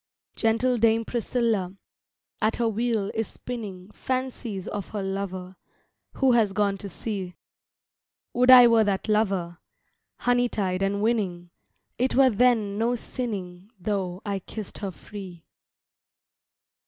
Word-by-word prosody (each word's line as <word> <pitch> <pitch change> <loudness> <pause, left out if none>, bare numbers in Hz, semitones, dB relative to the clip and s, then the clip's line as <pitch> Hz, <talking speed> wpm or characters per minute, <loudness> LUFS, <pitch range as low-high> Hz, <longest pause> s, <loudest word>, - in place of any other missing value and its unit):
Gentle 235 +2 +2
Dame 225 0 +3
Priscilla 225 -5 -1 0.7
At 215 +1 +2
her 235 - +1
wheel 225 -2 0
is 225 -2 -1
spinning 210 -6 -7
Fancies 250 -7 -3
of 205 -3 -5
her 205 -2 -4
lover, 190 -1 -4 0.6
who 270 -2 +3
has 220 -5 +3
gone 200 -1 +1
to 200 - -6
sea. 190 -2 -5 1.0
Would 250 +1 +3
I 250 -1 +11
were 230 -1 +5
that 200 0 -1
lover, 195 -6 0 0.6
Honey 245 0 +2
tongued 190 -4 -1
and 200 +1 0
winning, 185 -7 -1 0.5
It 255 +2 +1
were 265 -1 +6
then 220 -3 +2
no 235 +2 +2
sinning 200 -7 -5
though 185 -1 -2
I 200 -2 -1
kissed 210 +2 -8
her 200 - -3
free. 185 -3 -10
210 Hz, 130 wpm, -26 LUFS, 190-235 Hz, 1.0 s, I